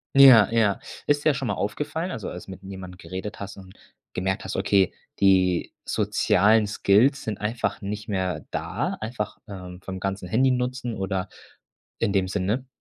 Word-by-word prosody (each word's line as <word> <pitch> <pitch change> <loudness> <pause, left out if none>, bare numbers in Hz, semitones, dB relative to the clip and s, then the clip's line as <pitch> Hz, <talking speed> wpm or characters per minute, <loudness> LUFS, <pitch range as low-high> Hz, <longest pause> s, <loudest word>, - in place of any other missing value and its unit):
Ja, 130 -6 +9
ja. 110 -4 +2 0.3
Ist 145 +1 +1
dir 155 - +6
das 130 - -3
schon 135 - -3
mal - - +1
aufgefallen, 160 - -3
also, 110 - -5
als 90 - -8
du 95 - -9
mit 95 +1 -11
jemandem 95 -1 -8
geredet 95 +4 -6
hast 100 0 -7
und 95 -1 -12 0.4
gemerkt 95 +1 -1
hast, - - -4
okay, 95 -2 +2 0.3
die 95 -3 +3
sozialen 105 +3 +3
Skills 105 +7 +3
sind 110 -3 -4
einfach 110 +2 -2
nicht 105 +2 -5
mehr 95 -6 -2
da, - - -2
einfach, 110 -1 -4
ähm, 90 -2 -9
vom 95 -1 -6
ganzen 95 -1 -3
Handynutzen 125 +1 +1
oder 95 -1 -2 0.7
in 100 - +1
dem 95 -1 +2
Sinne? 105 +7 -1
100 Hz, 170 wpm, -25 LUFS, 95-115 Hz, 0.7 s, Ja